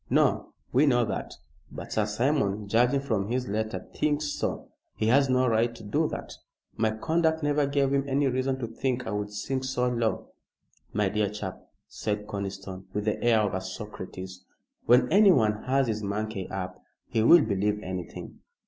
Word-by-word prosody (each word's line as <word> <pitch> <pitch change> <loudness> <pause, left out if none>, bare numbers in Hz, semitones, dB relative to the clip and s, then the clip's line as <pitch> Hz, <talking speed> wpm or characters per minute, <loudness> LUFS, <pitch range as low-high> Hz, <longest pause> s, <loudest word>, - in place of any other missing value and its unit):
"No. - - +2 0.2
We 140 +4 +5
know 120 -3 +4
that. 105 - -4 0.4
But - - -8
Sir 110 -1 +1
Simon, 105 -3 0
judging 125 +6 +3
from 110 -8 -1
his 125 +2 -1
letter, 110 +2 -3
thinks 150 0 0
so." - - -3 0.2
"He - - -1
has 135 +2 +4
no 130 0 +3
right 115 +1 +2
to 115 - -11
do 105 - +1
that. - - -6 0.4
My 110 0 +2
conduct 160 +8 0
never 145 -1 +2
gave 140 -1 +1
him 140 0 +1
any 140 +2 +2
reason 130 0 0
to 125 -3 -4
think 125 +2 -2
I 110 - -3
would 105 0 -2
sink 130 +6 -3
so 130 -1 0
low." 115 -2 -1 0.6
"My 105 -1 +1
dear 105 0 0
chap," 105 -2 -6 0.3
said 105 -1 -3
Conniston, 95 -2 -6
with 105 0 -1
the 105 - -1
air 115 -2 +4
of 105 -2 0
a 95 - -1
Socrates, 95 -1 -8 0.4
"when 125 +2 +6
anyone 135 - +5
has 135 +1 +2
his 110 -2 -2
monkey 105 -1 -3
up, 90 -1 -5 0.3
he 110 - 0
will 150 +8 +7
believe 105 0 0
anything." 90 -1 -6
110 Hz, 175 wpm, -27 LUFS, 105-130 Hz, 0.6 s, will